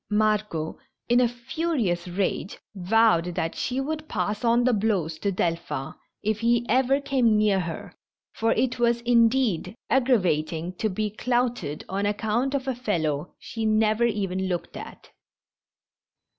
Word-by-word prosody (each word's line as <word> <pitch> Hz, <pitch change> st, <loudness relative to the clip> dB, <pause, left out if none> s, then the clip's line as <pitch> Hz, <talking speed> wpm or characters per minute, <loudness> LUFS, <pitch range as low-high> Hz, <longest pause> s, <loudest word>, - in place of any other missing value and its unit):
Margot, 210 Hz, -6 st, 0 dB, 0.3 s
in 240 Hz, +1 st, +5 dB
a 245 Hz, -, +4 dB
furious 240 Hz, -, -2 dB
rage, 185 Hz, +1 st, -2 dB, 0.2 s
vowed 180 Hz, -3 st, +2 dB
that 165 Hz, -2 st, -1 dB
she 255 Hz, +2 st, -2 dB
would 310 Hz, +3 st, -4 dB
pass 210 Hz, +2 st, -2 dB
on 235 Hz, +1 st, +3 dB
the 250 Hz, 0 st, +3 dB
blows 195 Hz, -7 st, 0 dB
to 200 Hz, -, 0 dB
Delphin 165 Hz, -6 st, -2 dB, 0.3 s
if 215 Hz, 0 st, 0 dB
he 235 Hz, +1 st, +2 dB
ever 265 Hz, +3 st, +3 dB
came 255 Hz, -6 st, +2 dB
near 210 Hz, -2 st, +3 dB
her, 170 Hz, -3 st, -5 dB, 0.4 s
for 225 Hz, 0 st, +1 dB
it 250 Hz, +1 st, 0 dB
was, 235 Hz, 0 st, +2 dB
indeed, 230 Hz, -5 st, +2 dB, 0.2 s
aggravating 180 Hz, -, +1 dB
to 220 Hz, -, 0 dB
be 210 Hz, +2 st, -2 dB
clouted 240 Hz, -, -1 dB
on 200 Hz, +2 st, -1 dB
account 220 Hz, +6 st, 0 dB
of 270 Hz, -1 st, -2 dB
a 265 Hz, -, +1 dB
fellow 170 Hz, -, -2 dB
she 225 Hz, -, -6 dB
never 215 Hz, +1 st, +3 dB
even 190 Hz, -4 st, -1 dB
looked 180 Hz, -2 st, -3 dB
at. -, -, -10 dB
215 Hz, 145 wpm, -25 LUFS, 185-240 Hz, 0.4 s, in